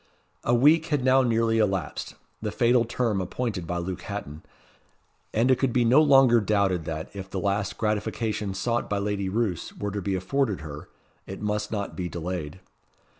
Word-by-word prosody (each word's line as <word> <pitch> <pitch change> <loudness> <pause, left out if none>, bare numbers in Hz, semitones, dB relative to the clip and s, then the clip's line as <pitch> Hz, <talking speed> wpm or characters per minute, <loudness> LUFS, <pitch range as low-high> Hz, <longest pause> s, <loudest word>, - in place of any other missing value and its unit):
A 120 - +3
week 150 +6 +5
had 145 -4 0
now 130 +1 +5
nearly 115 -2 +2
elapsed 95 -8 -1 0.3
the - - -2
fatal 120 0 +3
term 115 -4 0
appointed 95 -2 -3
by 90 - -2
Luke 90 +1 -4
Hatton 90 -8 -6 0.9
and 120 +4 +2
it 130 - +3
could 135 -2 +1
be 120 0 +2
no 130 +6 +6
longer 135 -5 +6
doubted 100 -5 +1
that, 80 +3 -5
if 95 -1 -7
the 95 - -3
last 100 +1 -1
gratification 105 -1 -2
sought 120 +4 -1
by 105 - 0
Lady 100 -1 -1
Roos 100 -5 -2
were 100 0 -3
to 100 0 -3
be 95 0 -1
afforded 105 - -1
her, 75 -1 -8 0.4
it 95 - -7
must 105 0 -2
not 100 -2 -3
be 90 -2 -3
delayed. 85 -1 -5
105 Hz, 175 wpm, -26 LUFS, 95-120 Hz, 0.9 s, no